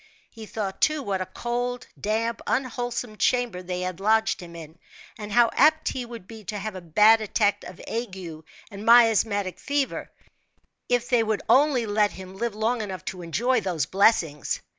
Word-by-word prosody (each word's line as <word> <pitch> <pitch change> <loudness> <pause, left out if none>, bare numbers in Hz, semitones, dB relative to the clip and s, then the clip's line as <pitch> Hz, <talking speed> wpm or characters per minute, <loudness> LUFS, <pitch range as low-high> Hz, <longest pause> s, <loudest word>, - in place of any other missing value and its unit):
He 220 -2 -10
thought, 195 -3 -5
too, 305 -2 +2
what 195 -4 -2
a 185 - -3
cold, 245 +1 -3 0.2
damp, 225 +2 -1
unwholesome 245 -3 -2
chamber 245 -8 +1
they 180 0 -4
had 185 -1 -4
lodged 220 +2 +2
him 170 -1 -11
in, 160 0 -11 0.4
and 210 -1 -8
how 235 +1 +4
apt 315 +2 +4
he 250 -2 -4
would 230 -6 -10
be 220 0 -11
to 210 +4 -4
have 215 +1 -5
a 185 - -8
bad 210 +7 +5
attack 210 -1 0
of 180 - -10
ague 225 -4 -4 0.5
and 200 0 -8
miasmatic 220 -4 +4
fever, 280 -1 -2 0.8
if 245 -1 +1
they 245 -3 +3
would 220 -2 -1
only 270 -4 +4
let 210 0 +1
him 190 0 -10
live 235 +1 -3
long 225 +2 0
enough 190 -5 -6
to 185 - -5
enjoy 230 +9 0
those 175 -7 -1
blessings. 180 -7 +1
215 Hz, 175 wpm, -25 LUFS, 190-240 Hz, 0.8 s, bad